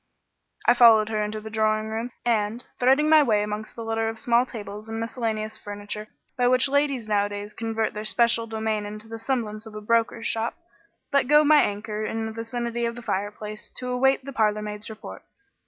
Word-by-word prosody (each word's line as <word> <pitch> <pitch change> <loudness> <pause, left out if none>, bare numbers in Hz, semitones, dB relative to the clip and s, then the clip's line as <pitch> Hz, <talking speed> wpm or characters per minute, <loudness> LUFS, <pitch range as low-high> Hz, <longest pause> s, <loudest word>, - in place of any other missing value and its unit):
I 240 - +7
followed 225 -3 +6
her 215 -1 0
into 210 +1 -3
the 220 0 -9
drawing 215 0 +1
room, 225 +2 -3 0.2
and, 225 0 0
threading 270 +4 +4
my 310 0 +7
way 215 -7 +2
amongst 210 +1 -5
the 230 - -6
litter 225 0 0
of 225 - -6
small 240 +2 +2
tables 210 -2 -8
and 225 0 -4
miscellaneous 225 -2 -3
furniture 205 +1 -6 0.3
by 250 -2 +2
which 255 +2 +4
ladies 280 -4 +1
nowadays 205 0 -1
convert 225 0 -2
their 210 - -5
special 230 +1 +2
domain 220 -1 -2
into 215 +1 -7
the 225 0 -7
semblance 225 -3 -2
of 215 - -11
a - - -4
broker's 230 +1 +1
shop, 225 +1 0 0.6
let 280 -2 +3
go 300 +2 +6
my 300 0 +6
anchor 210 +1 -2
in 225 +1 -2
the 220 - -4
vicinity 235 +1 -3
of 235 - -4
the 245 - -9
fireplace 210 +1 -4
to 250 0 -4
await 265 +1 +2
the 275 - -7
parlourmaid's 210 -2 -1
report. 220 -1 -9
225 Hz, 190 wpm, -25 LUFS, 215-240 Hz, 0.6 s, I